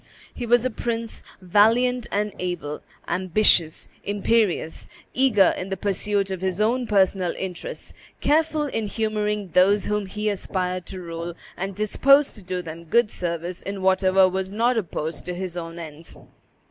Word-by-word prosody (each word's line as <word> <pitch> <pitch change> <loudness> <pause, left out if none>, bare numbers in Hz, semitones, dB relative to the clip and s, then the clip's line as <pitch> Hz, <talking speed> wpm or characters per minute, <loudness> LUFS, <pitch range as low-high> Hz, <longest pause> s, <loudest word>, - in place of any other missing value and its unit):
He 240 - -5
was 240 +1 +4
a 255 - 0
prince 230 0 -4 0.2
valiant 230 +6 +3
and 210 0 -1
able, 175 -5 -4 0.3
ambitious, 185 -3 +2 0.2
imperious, 205 -4 0 0.2
eager 235 -8 +4
in 185 - -5
the 195 - -3
pursuit 200 +1 0
of 190 -2 -4
his 190 0 -1
own 240 +3 +1
personal 190 -3 +2
interests, 185 -2 -6 0.3
careful 310 +1 +2
in 225 -6 -2
humoring 210 -2 -2
those 195 +3 +4
whom 210 -1 -1
he 210 +2 -3
aspired 185 -3 -2
to 190 - -6
rule, 170 -1 -6 0.2
and 195 +1 -4
disposed 275 +7 +4
to 210 - -10
do 180 -1 -4
them 165 0 -8
good 220 +6 +3
service 170 0 -4
in 195 -1 -5
whatever 190 0 +4
was 190 +1 -3
not 235 +4 +2
opposed 165 -6 -3
to 180 0 -4
his 180 -1 -5
own 165 -1 -6
ends. 160 -1 -9
195 Hz, 155 wpm, -24 LUFS, 180-215 Hz, 0.3 s, was